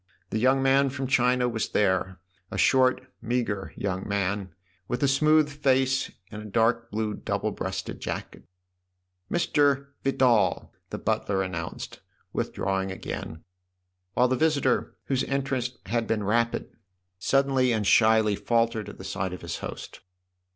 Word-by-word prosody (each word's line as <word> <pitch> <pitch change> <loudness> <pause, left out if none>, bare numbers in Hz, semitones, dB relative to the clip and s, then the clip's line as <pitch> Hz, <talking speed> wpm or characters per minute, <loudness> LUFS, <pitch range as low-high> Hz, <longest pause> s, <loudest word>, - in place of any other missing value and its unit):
The 110 - 0
young 130 +3 +3
man 135 +1 +4
from 135 0 -4
China 125 -1 +3
was 115 -2 -2
there 95 -2 +1 0.3
a - - -5
short, 130 -1 +4 0.2
meagre 115 -4 -2
young 95 0 -3
man, 100 -1 -1 0.4
with 125 +3 -2
a - - +5
smooth 155 +3 +4
face 135 -2 +1 0.2
and 105 - -7
a - - -9
dark 115 +3 +1
blue 110 0 -2
double - - -2
breasted - - -4
jacket. - - -5 0.4
" 90 0 -37
Mr. 145 -5 +2
Vidal! 130 -5 +2
" - - -49
the - - -4
butler 95 -1 0
an 95 - -5
nounced, 85 -1 -6 0.3
withdrawing 95 0 -1
again, 80 -3 -6 0.7
while 125 - +4
the 130 - +1
visitor, 140 -4 +1
whose 135 -2 0
entrance 130 -3 -2
had 115 +2 -1
been 110 -2 0
rapid, 115 +3 0 0.5
suddenly 135 +2 +2
and 110 -3 0
shyly 110 0 +5
faltered 115 -2 0
at - - -11
the - - -9
sight 95 -1 -3
of 90 - -8
his 85 0 -4
host. - - -7
115 Hz, 150 wpm, -26 LUFS, 100-130 Hz, 0.7 s, a